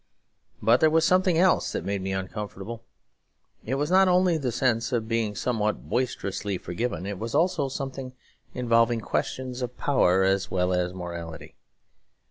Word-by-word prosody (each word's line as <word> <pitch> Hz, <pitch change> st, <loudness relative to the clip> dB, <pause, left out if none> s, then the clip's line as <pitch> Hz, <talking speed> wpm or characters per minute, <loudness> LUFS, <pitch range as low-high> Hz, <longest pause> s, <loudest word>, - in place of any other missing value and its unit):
But 115 Hz, +2 st, +5 dB
there 160 Hz, -, +5 dB
was 160 Hz, +1 st, +3 dB
something 185 Hz, -1 st, +3 dB
else 185 Hz, +2 st, +3 dB
that -, -, -4 dB
made 100 Hz, -1 st, -2 dB
me 95 Hz, +1 st, -3 dB
uncomfortable; 105 Hz, +3 st, -5 dB, 0.8 s
it 130 Hz, -, -2 dB
was 145 Hz, +4 st, -1 dB
not 190 Hz, +1 st, +6 dB
only 180 Hz, -1 st, +4 dB
the 135 Hz, -6 st, -1 dB
sense 115 Hz, 0 st, 0 dB
of 115 Hz, -3 st, -1 dB
being 115 Hz, -2 st, -1 dB
somewhat 105 Hz, -, -1 dB
boisterously 100 Hz, -5 st, -2 dB
forgiven; 90 Hz, 0 st, -3 dB
it 100 Hz, -1 st, -5 dB
was 115 Hz, +4 st, -4 dB
also 165 Hz, -3 st, +2 dB
something 135 Hz, -1 st, -5 dB, 0.4 s
involving 115 Hz, -1 st, +2 dB
questions 130 Hz, +3 st, -3 dB
of 125 Hz, 0 st, -4 dB
power 95 Hz, -9 st, +3 dB
as 95 Hz, 0 st, +1 dB
well 90 Hz, 0 st, +1 dB
as 90 Hz, 0 st, 0 dB
morality. 85 Hz, -3 st, -7 dB
115 Hz, 155 wpm, -26 LUFS, 95-135 Hz, 0.8 s, not